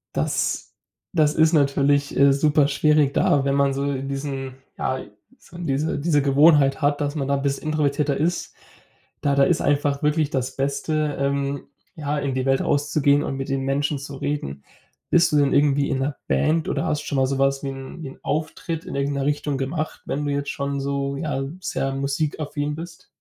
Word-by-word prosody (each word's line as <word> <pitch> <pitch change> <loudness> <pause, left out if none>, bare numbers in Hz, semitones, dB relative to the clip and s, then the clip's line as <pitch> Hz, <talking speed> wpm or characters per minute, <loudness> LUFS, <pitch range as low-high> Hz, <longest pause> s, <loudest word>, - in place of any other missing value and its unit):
Das - - -1 0.5
das 155 -3 +3
ist 160 +1 +4
natürlich, 140 -1 +2
äh, 140 0 +6
super 145 0 +3
schwierig 150 0 +3
da, 140 -1 +3
wenn 140 0 +1
man 140 -1 +2
so 140 - -2
in 135 0 -3
diesen 135 -2 -4 0.2
ja, 130 0 -1 0.4
so 175 - -14
diese 155 -1 -1
diese 145 -1 +2
Gewohnheit 145 0 +4
hat, 145 0 +2
dass 145 0 -1
man 140 - -1
da 140 - +2
'n 140 - -1
bisschen 140 +1 -2
introvertierter 145 -2 +1
ist. 170 +3 -1 0.7
Da 140 -1 +1
da 140 - +5
ist - - +2
einfach 145 -1 +1
wirklich 150 0 +2
das 130 0 -2
Beste, 145 +2 -1
ähm, 140 0 -1 0.3
ja, 150 -1 -2
in 140 -2 -2
die 130 0 -1
Welt 135 0 +2
rauszugehen 145 0 +2
und 135 - -3
mit 135 - -4
den 135 0 0
Menschen 140 +1 0
zu 140 0 -8
reden. 135 - -4 0.5
Bist 170 -2 +4
du 150 - +3
denn 140 -1 +3
irgendwie 140 -1 +3
in 135 - 0
'ner 135 +1 -1
Band 155 - +1
oder - - -1
hast 150 - 0
schon 140 - -3
mal 130 - +3
sowas 135 +1 +1
wie 140 - -2
'n 135 +4 -8
wie 135 - -5
'n - - -14
Auftritt 160 +2 -3
in - - -6
irgendeiner 140 0 -1
Richtung 145 -1 -1
gemacht? 155 +4 -3
Wenn 150 +2 -2
du 145 - -1
jetzt 145 0 -2
schon 140 0 -3
so, 140 0 -2
ja, 140 -3 -2 0.2
sehr 135 -6 -2
musikaffin 145 +1 -2
bist? 165 +1 -9
140 Hz, 195 wpm, -23 LUFS, 135-150 Hz, 0.7 s, äh